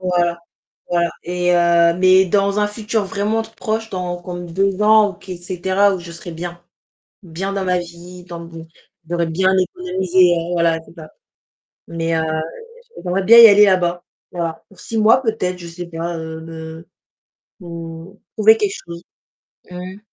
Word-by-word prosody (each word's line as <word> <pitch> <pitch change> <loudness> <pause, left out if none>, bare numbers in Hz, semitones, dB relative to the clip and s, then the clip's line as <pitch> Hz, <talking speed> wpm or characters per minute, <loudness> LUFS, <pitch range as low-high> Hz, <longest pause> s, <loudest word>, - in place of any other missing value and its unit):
Voilà. 175 -2 0 0.5
Voilà. 170 -1 +1
Et, 180 0 0
heu, 170 -1 +4
mais 185 +1 +5
dans 200 +2 +1
un 210 - +2
futur 215 +1 -2
vraiment 210 +3 -1
proche 225 0 -4
dans 180 -2 -4
comme 175 -1 -7
2 195 +2 0
ans, 215 -1 +5
ou - - -14
qu'est 185 +1 -9
cetera, 190 +3 +1
où - - -6
je 170 -1 -10
serai 170 +1 -9
bien. 175 +1 -7 0.6
Bien 190 +2 -5
dans 195 -1 -2
ma 180 -1 +1
vie, 175 +1 -9
dans 170 -2 -8
mon 165 -1 -10 0.4
j'aurais 170 -1 0
bien 185 +3 +1
économisé, 185 0 -2 0.2
heu, 170 +1 -3
voilà, 170 -1 +1
c'est - - -17
ça. 155 -2 -11 0.8
Mais, 165 0 -2
heu, - - +1 0.8
j'aimerais 180 +2 0
bien 230 +4 +8
y 230 -1 +11
aller 205 0 +7
là-bas, 180 -2 +1 0.3
voilà. 165 -2 -4
Pour 195 - -16
6 230 - -6
mois 225 +4 +5
peut-être, 200 -6 -2
je 175 - -9
sais 175 +1 -8
pas, 170 0 -5
heu, 160 0 -7
me 160 0 -9 0.7
mmh. 170 0 -9 0.2
Trouver 220 +1 +6
quelque 205 -3 -1
chose. 170 0 -9 0.7
Mmh. 180 +2 -8
180 Hz, 165 wpm, -19 LUFS, 170-195 Hz, 0.8 s, y